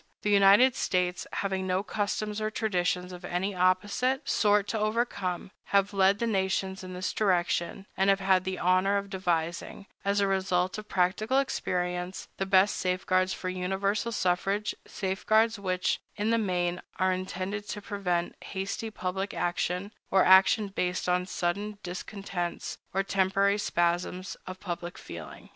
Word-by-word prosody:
The 210 - +1
United 205 +6 +6
States, 180 -1 0
having 190 -1 -2
no 185 +1 +1
customs 210 +1 -2
or 215 - 0
traditions 180 -4 -1
of 180 0 -10
an 175 +1 -2
opposite 200 +9 +1
sort 205 -1 +3
to 220 - -1
overcome, 210 -5 -1
have 200 +1 +2
led 195 0 +4
the 235 - -1
nations 190 -2 -1
in 185 0 -7
this 185 +2 -2
direction, 180 -2 0
and 190 +1 +2
have 195 0 +4
had 190 -1 +3
the 190 0 -3
honor 185 +3 +3
of 200 0 -4
devising, 175 0 -2 0.2
as 200 +1 +1
a 200 - +3
result 190 -1 0
of 215 - -11
practical 205 +7 +1
experience, 180 -8 -2
the 195 - -2
best 190 +1 +4
safeguards 185 0 +1
for 185 - -4
universal 195 +4 -1
suffrage, 195 +1 0
safeguards 215 +3 +1
which, 185 -2 0 0.2
in 215 +1 0
the 230 - +3
main, 180 -3 0 0.2
are 185 -1 +2
intended 185 +2 -4
to - - -3
prevent 185 -4 -2
hasty 195 +3 -4
public 190 -1 -3
action, 180 +3 -1 0.2
or 190 -1 +4
action 190 +3 +6
based 180 -2 -2
on 180 0 +1
sudden 200 +4 -2
discontents 180 -1 -5
or 195 +1 +1
temporary 195 +1 +2
spasms 175 +1 0
of 185 0 -7
public 175 -2 -5
feeling. - - -10
190 Hz, 150 wpm, -28 LUFS, 180-205 Hz, 0.2 s, United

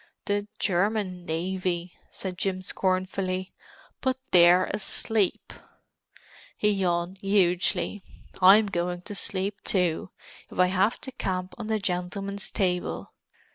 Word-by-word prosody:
"The 205 -1 -1
German 185 -1 0
navy!" 180 +1 -2 0.2
said 185 -2 -6
Jim 185 -1 -1
scornfully. 185 0 -1 0.5
"But 260 -1 0
they're 180 +1 +7
asleep!" 210 0 0 1.0
He 210 - +3
yawned 180 -1 -1
hugely. 195 +1 +1 0.4
"I'm 200 +4 +8
going 175 -2 -2
to 205 - -7
sleep, 200 0 -1
too, 180 -3 0 0.4
if - - -11
I 180 - +6
have 195 +5 +2
to 265 - -7
camp 185 -7 -3
on 220 - -5
the 220 0 +1
gentleman's 195 +1 -3
table. 180 -2 -2
185 Hz, 115 wpm, -27 LUFS, 180-200 Hz, 1.0 s, I'm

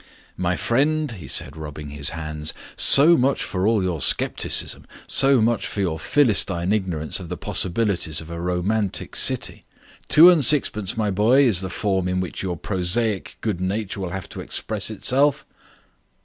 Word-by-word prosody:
"My 90 0 -2
friend," 145 - 0
he 95 -8 -10
said, - - -3
rubbing 75 -1 -9
his 70 -1 -1
hands, 75 -2 -4 0.2
"so 155 +5 +7
much 135 0 0
for 95 +1 -2
all 110 -3 +1
your 90 -5 -3
scepticism. - - 0 0.2
So 135 -3 +3
much 115 0 0
for - - -7
your 85 -5 -2
philistine 100 - +1
ignorance 90 -7 -2
of 90 -3 -10
the - - -5
possibilities 90 -4 +1
of 80 +1 -10
a 85 0 -6
romantic 90 +4 -2
city. - - 0 0.4
Two 170 +4 +8
and 165 -5 +2
sixpence, 110 -7 +2
my 105 -2 -1
boy, 115 +8 +3
is 110 -9 +2
the 95 - -5
form 95 -1 -2
in 90 0 -2
which 90 -1 -5
your 90 -3 -4
prosaic 95 +4 -2
good 105 -5 -3
nature 100 +2 -3
will 95 -2 -4
have 95 +1 -7
to - - -8
express - - -3
itself." 140 +2 +1
95 Hz, 165 wpm, -21 LUFS, 85-115 Hz, 0.4 s, Two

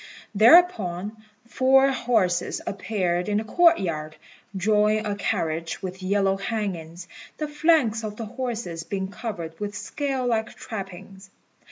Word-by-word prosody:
Thereupon 215 - +4 0.3
four 265 +2 +4
horses 220 -9 0
appeared 185 -3 -1
in 205 - +1
the 215 - 0
court 340 +8 +4
yard, 155 -4 -4 0.4
drawing 210 +2 +2
a 205 - -1
carriage 165 -5 -2
with 185 0 -6
yellow 195 0 +1
hangings, 185 -5 -4 0.3
the 305 - -3
flanks 295 -7 +2
of 210 -1 -5
the 225 - -5
horses 225 -8 -4
being 190 0 -4
covered 175 -6 -6
with 205 -1 -4
scale 270 +3 -3
like 225 -2 -1
trappings. 195 -2 -8
205 Hz, 130 wpm, -25 LUFS, 185-235 Hz, 0.4 s, Thereupon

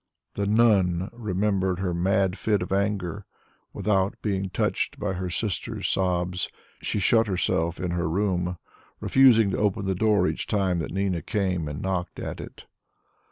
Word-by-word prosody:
The 100 0 -2
"nun" 100 -5 +3
remembered 100 -4 0
her 90 -2 -1
mad 95 +2 +1
fit 105 -3 0
of 90 - -8
anger; 100 -1 -1 0.4
without 100 -1 0
being 95 -2 -1
touched - - -1
by 95 - -1
her 90 0 -3
sister's 95 +1 -2
sobs, 90 -1 0 0.3
she - - -2
shut 110 +2 +3
herself 85 -3 0
in 90 -2 -2
her 85 -2 -1
room, 90 -1 0 0.4
refusing 115 -6 +5
to - - -1
open 105 -1 0
the 95 - +1
door 100 -1 +3
each - - -3
time 95 -4 +1
that 80 - -3
Nina 95 -2 -1
came 90 -6 -1
and 75 0 -5
knocked 95 -2 -2
at - - -5
it. - - -11
95 Hz, 160 wpm, -26 LUFS, 90-105 Hz, 0.4 s, refusing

